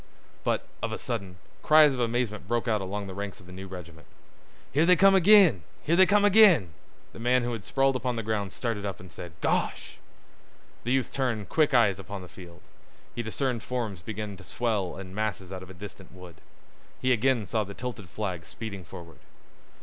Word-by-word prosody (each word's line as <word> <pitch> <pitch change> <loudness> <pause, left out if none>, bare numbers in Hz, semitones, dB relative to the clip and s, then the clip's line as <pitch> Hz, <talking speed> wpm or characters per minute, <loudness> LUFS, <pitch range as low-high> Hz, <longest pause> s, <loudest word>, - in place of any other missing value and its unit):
But, - - 0 0.2
of - - -2
a - - -3
sudden, 100 -7 -5 0.2
cries 155 -2 +6
of 130 - -5
amazement 115 -4 -1
broke 120 +2 -1
out 110 -3 +1
along 100 +2 -4
the 95 - -7
ranks 100 0 -6
of 90 - -16
the 90 - -13
new 95 +1 -8
regiment. 85 -4 -10 0.6
"Here 150 - +3
they 180 +2 +6
come 195 +2 +6
ag'in! 190 - +6 0.2
Here 165 - +2
they 190 +1 +6
come 205 +2 +4
ag'in!" 190 - +6 0.4
The - - -11
man 125 +2 +2
who 120 - -2
had 110 -4 -5
sprawled 135 +3 +1
upon 125 -1 -1
the 115 - -3
ground 105 -3 -2
started 115 -3 -3
up 100 -3 -4
and 90 -1 -12
said, 85 -1 -9
"Gosh!" - - -1 0.9
The 120 - -1
youth 130 -3 0
turned 115 -7 -2
quick 155 -4 +2
eyes 100 -6 +4
upon 100 -1 -7
the - - -10
field. 90 0 -13 0.5
He 120 - -3
discerned 120 +1 -2
forms 110 -8 -4
begin 105 0 -6
to 100 - -13
swell 105 -3 -2
in 95 -1 -9
masses 100 -3 -3
out 95 -1 -6
of 95 - -11
a 95 - -11
distant 95 0 -10
wood. 90 -2 -13 0.6
He 130 0 +2
again 120 -1 +1
saw 110 +1 0
the 100 0 -9
tilted 115 -7 -6
flag 90 -4 -4
speeding 100 -5 -7
forward. 85 -2 -12
105 Hz, 200 wpm, -27 LUFS, 95-125 Hz, 0.9 s, cries